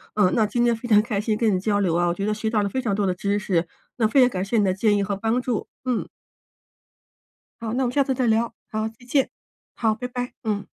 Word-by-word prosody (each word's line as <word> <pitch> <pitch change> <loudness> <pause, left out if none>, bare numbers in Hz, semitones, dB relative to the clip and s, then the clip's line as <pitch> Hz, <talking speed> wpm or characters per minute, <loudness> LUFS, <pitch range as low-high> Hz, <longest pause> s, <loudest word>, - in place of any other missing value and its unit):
嗯， 205 -4 +4
那 220 - +3
今 240 +3 0
天 235 -1 +4
非 230 +2 -5
常 210 -2 +6
开 215 -2 -2
心 210 0 0
跟 220 -3 +2
你 185 - +1
交 205 +1 +1
流 180 -4 +1
啊， 175 +1 +2
我 170 - +1
觉 195 +3 -3
得 210 - +1
学 220 +1 -2
到 215 -2 +1
了 200 - -1
非 260 +5 -2
常 215 -6 0
多 205 0 0
的 185 - +1
知 200 +3 -1
识， 180 -5 0 0.3
那 225 -3 +3
非 265 +5 +4
常 250 - +6
感 185 -5 -3
谢 230 +4 0
你 210 - +4
的 185 -2 +2
建 205 +2 +2
议 200 - +1
和 200 +1 -2
帮 225 +5 0
助， 245 -3 -2 0.2
嗯。 250 -2 -1 1.5
好， 225 -1 -3
那 265 - +1
我 - - +1
们 - - -3
下 280 - +3
次 265 - 0
再 255 -1 0
聊。 230 +1 +1 0.2
好， 215 0 -1
再 220 - -15
见。 270 +1 +1 0.4
好， 220 -2 +1
拜 250 +3 -5
拜。 245 0 -4
嗯。 210 -2 -2
215 Hz, 295 characters per minute, -24 LUFS, 200-240 Hz, 1.5 s, 常